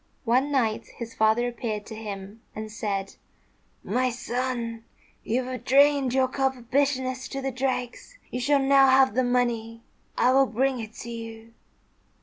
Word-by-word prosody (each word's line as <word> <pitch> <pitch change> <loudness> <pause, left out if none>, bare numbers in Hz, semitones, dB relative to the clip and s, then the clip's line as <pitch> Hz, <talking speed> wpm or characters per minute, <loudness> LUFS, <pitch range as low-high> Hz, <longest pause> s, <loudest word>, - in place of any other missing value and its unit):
One 255 +5 +2
night 230 -6 0
his 230 -1 -7
father 220 +3 +2
appeared 220 -3 -4
to 225 - -9
him 205 0 -7
and 215 0 -6
said, 200 -3 -3 0.7
"My 255 0 +1
son, 240 -1 -3 0.4
you 250 +3 0
have 255 0 -6
drained 280 0 +4
your 260 0 +3
cup 265 0 0
of 240 0 -16
bitterness 260 -2 0
to 275 - -5
the 270 0 -2
dregs. 255 - -3
You 250 - -3
shall 285 +3 +3
now 275 0 +5
have 260 -2 +5
the 255 +3 +2
money. 235 -2 -1 0.3
I 250 - +4
will 270 +1 +4
bring 260 +2 0
it 220 -1 -7
to 235 - -7
you." 225 0 -8
245 Hz, 160 wpm, -26 LUFS, 225-265 Hz, 0.7 s, now